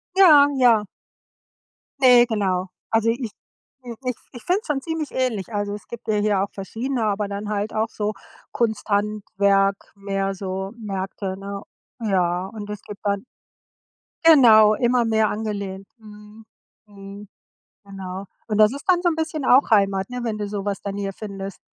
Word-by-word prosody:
Ja, 305 -7 +8
ja. 225 -4 +4 1.1
Ne, 250 -2 +7
genau. 190 -4 -1 0.2
Also, 225 0 +2
ich 235 -2 -2 0.5
äh, 235 -2 -7
ich 250 -2 -1 0.2
ich 245 - -11
find's 375 +4 0
schon 280 -3 -1
ziemlich 320 -2 -4
ähnlich, 230 -5 -2
also, 205 0 -2
es 210 - -9
gibt 235 -1 -10
ja 215 - +1
hier 205 -2 +2
auch 200 - -4
verschiedene, 230 +5 -3
aber 205 -1 0
dann 205 +1 -5
halt 210 +1 -2
auch 220 +1 0
so 210 0 -3 0.4
Kunsthandwerk, 200 -3 0
mehr 195 0 -2
so 190 +1 -4
Märkte, 195 -2 -5
ne? 200 0 -7 0.4
Ja, 185 -4 0
und 210 -2 -7
das 210 -1 -6
gibt 205 - -10
dann 200 +2 -1 1.0
genau, 220 -9 +7
immer 240 +1 +2
mehr 220 -1 +2
angelehnt. 200 -3 -4
Mhm. 210 0 -14 0.4
Mhm. 200 0 -11 0.6
Genau. 195 -1 -7 0.2
Und 210 -2 -1
das 215 +1 +6
ist 280 - -8
dann 355 -1 +4
so 350 - +3
'n 320 - -2
bisschen 320 -2 -3
auch 255 -1 +5
Heimat, 195 -1 +2
ne? 250 - -4
Wenn 220 -2 -2
du 205 -1 -3
so 200 -1 -4
was 200 -1 -2
dann 200 0 -5
hier 195 -1 -3
findest. 195 -2 -7
210 Hz, 165 wpm, -22 LUFS, 195-235 Hz, 1.1 s, Ja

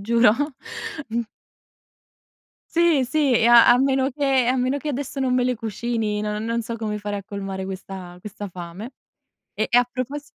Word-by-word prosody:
giuro. 230 +1 +4 0.8
Mh. 230 +1 -1 1.5
Sì, 335 -5 +3
sì, 285 0 +2
e 230 0 +4
a 240 -1 +8
a 245 - +7
meno 265 0 +2
che 270 -2 +1
a 255 - +3
meno 255 +2 +1
che 300 +1 -5
adesso 275 0 -3
non 255 -1 +1
me 250 - +3
le 250 0 +1
cucini, 225 -1 -2
non 210 0 -3
non 230 +1 -1
so 230 +1 -5
come 210 -1 -3
fare 205 0 -4
a 200 - -7
colmare 195 -1 -5
questa 190 -2 -8
questa 205 0 -7
fame. 180 +7 -8 0.6
E - - 0
e 240 - +3
a 245 - +7
propos 265 +4 -4
235 Hz, 180 wpm, -23 LUFS, 210-260 Hz, 1.5 s, a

